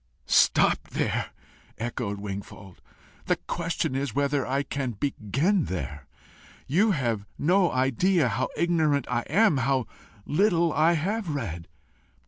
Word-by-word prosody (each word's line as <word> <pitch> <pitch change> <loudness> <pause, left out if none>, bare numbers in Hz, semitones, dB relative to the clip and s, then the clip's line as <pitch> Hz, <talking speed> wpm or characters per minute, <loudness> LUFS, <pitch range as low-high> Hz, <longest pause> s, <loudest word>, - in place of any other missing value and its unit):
"Stopped - - +3
there!" - - 0 0.5
echoed 115 -3 -3
Wingfold. 100 -2 -8 0.5
"The - - +3
question 165 -4 -3
is 135 -3 -2
whether 140 -1 0
I 135 +2 0
can 135 -3 -3
begin 140 - 0
there. 75 -6 -5 0.6
You 185 +11 +3
have 120 - -1
no 180 +3 +3
idea 135 - +2
how 120 +3 -1
ignorant 155 -6 +2
I 120 - +1
am 210 -8 +4
how 130 -1 +1 0.4
little 170 -1 +2
I 160 +2 +4
have 195 +5 -1
read!" 85 - -4
140 Hz, 120 wpm, -26 LUFS, 120-170 Hz, 0.6 s, am